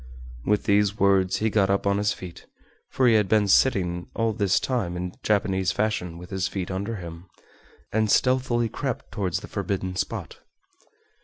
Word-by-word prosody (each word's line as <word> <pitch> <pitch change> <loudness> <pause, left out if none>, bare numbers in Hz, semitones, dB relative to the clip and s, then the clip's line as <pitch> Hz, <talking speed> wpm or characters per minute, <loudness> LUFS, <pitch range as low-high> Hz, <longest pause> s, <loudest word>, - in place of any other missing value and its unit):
With 105 0 +1
these 105 0 +2
words 95 -1 +3
he 110 +1 0
got 100 -3 +2
up 100 +1 +1
on 100 0 +2
his 105 0 +1
feet 90 -2 -9 0.4
(for 130 - +1
he 120 - +5
had 105 -3 +3
been 105 -1 +3
sitting 90 -6 +2
all 115 -1 +1
this 100 -3 +2
time 115 -10 -2
in 90 0 -4
Japanese 95 -3 +1
fashion 95 -6 -2
with 90 +2 -11
his 95 -1 -1
feet 95 -1 -4
under 100 +5 -3
him) 85 -1 -9 0.7
and 110 0 +2
stealthily 125 -1 +2
crept 130 +2 -4
towards 95 -3 -2
the - - -9
forbidden 95 -2 -3
spot. - - -4
100 Hz, 170 wpm, -25 LUFS, 95-110 Hz, 0.7 s, he